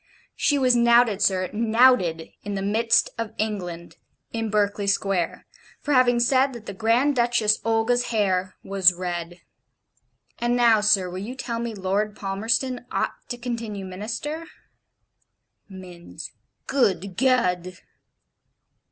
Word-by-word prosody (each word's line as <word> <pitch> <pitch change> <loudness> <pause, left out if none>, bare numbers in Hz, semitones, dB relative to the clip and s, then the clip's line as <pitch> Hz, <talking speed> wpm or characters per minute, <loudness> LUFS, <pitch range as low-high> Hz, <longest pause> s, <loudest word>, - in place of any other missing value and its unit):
She 290 - +1
was 255 -2 +3
knouted, 235 -3 +4
sir, 185 -2 +1
knouted 220 -7 +3
in 205 0 -5
the 195 - -3
midst 225 +3 +2
of 225 -1 -4
England 180 -6 -4 0.4
in 225 -1 -2
Berkeley 205 -1 0
Square, 195 -3 -1 0.3
for 295 - -2
having 245 -2 +4
said 260 +2 +2
that 235 -3 -10
the 200 - -6
Grand 230 +8 +2
Duchess 235 -3 +2
Olga's 225 +2 +1
hair 190 -4 0
was 190 -2 +3
red. 175 -1 -5 1.0
And 240 +1 +1
now, 235 -3 +4
sir, 205 -3 +3
will 180 +1 -6
you 225 +6 -6
tell 235 -3 -4
me 235 -1 -4
Lord 200 +2 -1
Palmerston 225 +6 -2
ought - - -1 0.2
to 245 - -4
continue 230 -5 -5
Minister?' 225 - -5 1.2
Minns: 180 -3 -10 0.3
'Good 200 -7 0
Ged!' 185 -8 +1
215 Hz, 125 wpm, -24 LUFS, 190-240 Hz, 1.2 s, knouted